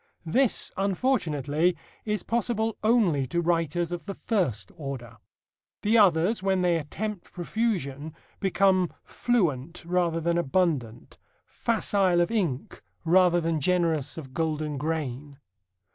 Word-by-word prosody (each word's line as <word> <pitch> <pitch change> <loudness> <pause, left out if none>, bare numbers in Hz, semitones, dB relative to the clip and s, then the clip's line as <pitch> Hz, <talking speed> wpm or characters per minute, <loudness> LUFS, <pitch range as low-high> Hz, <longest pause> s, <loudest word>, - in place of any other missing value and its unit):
This, 245 +9 +2
unfortunately, 175 - +1 0.3
is 210 -1 -1
possible 225 -1 0
only 200 - +3
to 170 - -1
writers 170 0 0
of 175 +2 -5
the 195 - -4
first 130 - -1
order. 135 -7 -7 0.7
The 215 +2 +3
others, 185 +2 +4
when 190 -1 +1
they 175 -1 +3
attempt 195 +6 -5
profusion, 165 - -2 0.2
become 190 -2 +2
fluent 170 - -1
rather 170 -1 +1
than 170 +1 +1
abundant, 135 -8 -1 0.3
facile 200 -5 +1
of 175 +5 +1
ink 170 - -2 0.2
rather 175 +1 +5
than 165 -2 -1
generous 165 -4 +1
of 135 -5 -8
golden 155 -2 -2
grain. 145 -2 -3
170 Hz, 115 wpm, -27 LUFS, 150-195 Hz, 0.7 s, rather